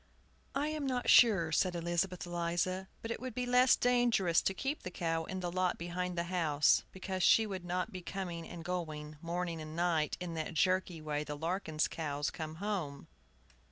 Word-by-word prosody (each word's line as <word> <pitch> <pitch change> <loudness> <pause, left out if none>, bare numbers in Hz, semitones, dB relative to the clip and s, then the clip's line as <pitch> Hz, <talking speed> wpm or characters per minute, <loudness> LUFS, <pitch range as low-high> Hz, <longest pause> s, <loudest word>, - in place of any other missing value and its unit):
"I 290 +2 +1
am 305 -2 -2
not 250 -2 +1
sure," 195 -9 +6
said 180 +3 +2
Elizabeth 175 +1 -1
Eliza, 175 +2 -1 0.2
"but 225 - -4
it - - -3
would 255 -2 -6
be 250 - -1
less 250 +1 +5
dangerous 240 -8 +3
to 195 - 0
keep 275 +7 -2
the - - -5
cow 165 -2 -1
in 190 +2 -5
the 175 -1 -2
lot 185 0 0
behind 175 +1 -3
the 170 - +1
house, 165 -5 +3
because 190 0 -4
she 220 +4 +6
would 190 -4 -5
not 180 +1 -2
be 185 - -6
coming 175 -2 -5
and 170 -1 -8
going, 155 -4 -4
morning 170 -1 -3
and 155 0 -7
night, 170 -3 +1
in 180 -2 -4
that 160 +1 -4
jerky 185 -1 +1
way 150 -1 -2
the 150 -1 -6
Larkins' 160 -1 -1
cows 145 -2 -2
come 155 -1 -6
home. 180 -7 -4
175 Hz, 190 wpm, -33 LUFS, 165-190 Hz, 0.2 s, sure